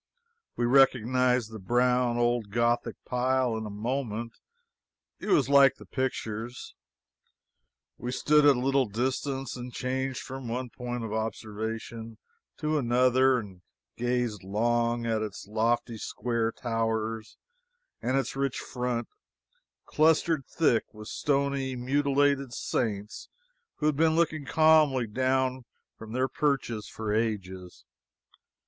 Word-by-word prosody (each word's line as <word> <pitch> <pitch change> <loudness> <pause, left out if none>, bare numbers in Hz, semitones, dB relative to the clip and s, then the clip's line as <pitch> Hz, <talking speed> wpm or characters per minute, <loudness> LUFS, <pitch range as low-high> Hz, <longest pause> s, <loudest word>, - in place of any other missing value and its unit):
We 120 - 0
recognized 125 -2 +3
the 110 - -7
brown 125 +3 +2
old 120 -3 +1
Gothic 120 +3 +1
pile 125 -1 +1
in 110 -1 -4
a - - -6
moment; 115 +1 -3 0.9
it - - -7
was 150 -10 +3
like 140 -1 +6
the - - -14
pictures. 120 -3 -4 1.3
We 120 +1 -4
stood 150 +3 +3
at 145 -1 +6
a - - -2
little 135 0 +2
distance 130 +5 -2
and 125 0 -7
changed 130 +1 -2
from 130 -1 -7
one 125 +1 -3
point 120 -1 -5
of 110 -1 -4
observation 110 +1 -4 0.4
to 155 0 0
another 130 +1 +3
and 100 -6 -7 0.3
gazed 120 -4 -1
long 120 +4 0
at 110 -1 0
its 105 -2 -5
lofty 115 +2 0
square 115 -1 -1
towers 115 -2 -2 0.6
and 130 +2 0
its 135 -1 -2
rich 135 -1 -1
front, 125 -1 -3 0.8
clustered 160 -2 +2
thick 125 -9 +1
with 105 0 -9
stony, 140 -2 0
mutilated 140 0 +1
saints 105 -3 -3 0.5
who 150 - -3
had 150 -2 +2
been 160 0 +3
looking 155 -3 +1
calmly 155 -5 +4
down 130 +2 0 0.3
from 110 -1 -10
their 130 +1 +1
perches 130 -6 -1
for 110 -2 -3
ages. 95 -5 -3
125 Hz, 125 wpm, -28 LUFS, 115-135 Hz, 1.3 s, like